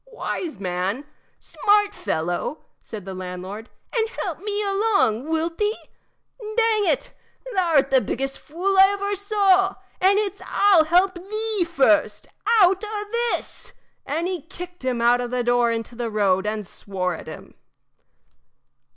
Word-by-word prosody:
"Wise 340 Hz, -, -4 dB
man! 190 Hz, +7 st, -2 dB, 0.3 s
smart 415 Hz, 0 st, +2 dB
fellow!" 175 Hz, -, -3 dB, 0.2 s
said 210 Hz, -4 st, -9 dB
the 190 Hz, -, -6 dB
landlord, 185 Hz, +4 st, -7 dB, 0.3 s
"and 450 Hz, -2 st, +1 dB
help -, -, -5 dB
me 415 Hz, 0 st, -1 dB
along, 395 Hz, -, +1 dB
wilt 325 Hz, +1 st, -1 dB
thee? 425 Hz, +1 st, 0 dB, 0.6 s
Dang 435 Hz, -1 st, +1 dB
it! -, -, 0 dB, 0.4 s
thou 350 Hz, -4 st, +1 dB
'rt 270 Hz, -1 st, +4 dB
the 265 Hz, -1 st, +5 dB
biggest 270 Hz, +3 st, -3 dB
fool 375 Hz, +5 st, -1 dB
I 385 Hz, -, +10 dB
ever 405 Hz, 0 st, -2 dB
saw, 390 Hz, -1 st, +2 dB, 0.2 s
and 390 Hz, +2 st, +4 dB
it's 405 Hz, -1 st, -2 dB
I'll 390 Hz, -6 st, +4 dB
help 360 Hz, +4 st, +3 dB
thee 415 Hz, +1 st, +1 dB
first 215 Hz, -8 st, +2 dB, 0.4 s
out 380 Hz, +3 st, +3 dB
o' 420 Hz, -1 st, -3 dB, 0.3 s
this!" -, -, -9 dB, 0.3 s
And 325 Hz, +4 st, -2 dB
he 365 Hz, -3 st, -3 dB
kicked 355 Hz, 0 st, -10 dB
him 250 Hz, -2 st, -1 dB
out 245 Hz, +1 st, +4 dB
of 245 Hz, -, -4 dB
the 250 Hz, 0 st, -1 dB
door 240 Hz, 0 st, +2 dB
into 230 Hz, +1 st, -4 dB
the 235 Hz, -1 st, -4 dB
road 200 Hz, -2 st, +1 dB
and 210 Hz, -1 st, -3 dB
swore 180 Hz, -1 st, -4 dB
at -, -, -9 dB
him. -, -, -10 dB
330 Hz, 150 wpm, -23 LUFS, -, 0.6 s, I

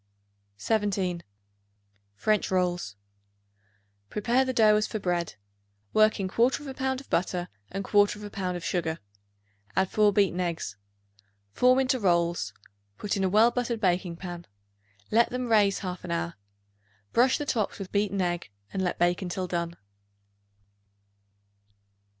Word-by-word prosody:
17. 190 Hz, -, 0 dB, 0.9 s
French 215 Hz, -, +1 dB
Rolls. 175 Hz, -, 0 dB, 1.1 s
Prepare 240 Hz, +5 st, +2 dB
the 260 Hz, -, -1 dB
dough 220 Hz, -4 st, +5 dB
as 215 Hz, -, 0 dB
for -, -, -3 dB
bread. 175 Hz, -4 st, -1 dB, 0.6 s
Work 215 Hz, 0 st, +4 dB
in 195 Hz, -, -1 dB
1/4 260 Hz, +7 st, 0 dB
pound 265 Hz, 0 st, -1 dB
of 275 Hz, -, -19 dB
butter 180 Hz, 0 st, 0 dB, 0.2 s
and 195 Hz, +1 st, -4 dB
1/4 205 Hz, 0 st, +2 dB
pound 185 Hz, -2 st, -2 dB
of 175 Hz, -, -8 dB
sugar. 165 Hz, -3 st, -1 dB, 0.8 s
Add 190 Hz, -1 st, +1 dB
4 210 Hz, -1 st, +4 dB
beaten 195 Hz, -3 st, +2 dB
eggs; 165 Hz, -, -2 dB, 0.8 s
form 250 Hz, -, +4 dB
into 260 Hz, -1 st, +2 dB
rolls; 170 Hz, -, +1 dB, 0.5 s
put 205 Hz, -, -2 dB
in 195 Hz, -, -1 dB
a 190 Hz, -, +2 dB
well 220 Hz, +5 st, +5 dB
buttered 240 Hz, -1 st, -2 dB
baking 180 Hz, -3 st, 0 dB
pan; 175 Hz, -1 st, -8 dB, 0.6 s
let 230 Hz, +2 st, +4 dB
them 250 Hz, -1 st, -3 dB
raise 205 Hz, -3 st, +4 dB
half 180 Hz, -1 st, -5 dB
an -, -, -7 dB
hour. 85 Hz, 0 st, -2 dB, 0.8 s
Brush 250 Hz, +3 st, +4 dB
the 295 Hz, -, -4 dB
tops 225 Hz, -7 st, -1 dB
with 195 Hz, -2 st, -7 dB
beaten 200 Hz, -2 st, +1 dB
egg 175 Hz, -, -2 dB, 0.2 s
and 190 Hz, -, -1 dB
let 180 Hz, -, -1 dB
bake 175 Hz, +2 st, +2 dB
until 185 Hz, 0 st, -3 dB
done. 170 Hz, -1 st, -3 dB
195 Hz, 140 wpm, -27 LUFS, 175-220 Hz, 1.1 s, dough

